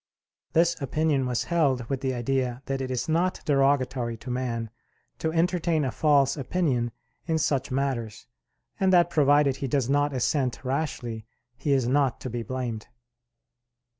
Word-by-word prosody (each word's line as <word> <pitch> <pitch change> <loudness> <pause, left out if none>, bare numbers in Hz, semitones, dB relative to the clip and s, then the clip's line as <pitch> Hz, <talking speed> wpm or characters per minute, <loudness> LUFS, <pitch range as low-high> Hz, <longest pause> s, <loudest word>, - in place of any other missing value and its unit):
This 170 0 +2
opinion 140 -1 +1
was 125 -2 0
held 140 -8 +1
with 135 0 -2
the 130 -2 -1
idea 125 +1 -1
that 135 0 -2
it 130 - -3
is 130 +5 -2
not 170 +3 +1
derogatory 135 -4 +1
to 125 +3 -7
man 120 -3 -3 0.5
to 160 - -1
entertain 165 -2 +1
a 130 - -1
false 145 0 +3
opinion 135 -5 0 0.4
in 160 -1 +1
such 140 -4 0
matters, 130 -5 -2 0.5
and 190 -1 +3
that 175 -2 +4
provided 145 -2 +4
he 135 - -3
does 135 -1 0
not 145 +1 +2
assent 130 0 -1
rashly, 125 -5 -3 0.3
he 145 +4 -2
is 130 -3 +2
not 135 -1 +2
to 130 - -5
be 120 0 -3
blamed. 120 -3 -4
135 Hz, 155 wpm, -26 LUFS, 125-150 Hz, 0.5 s, that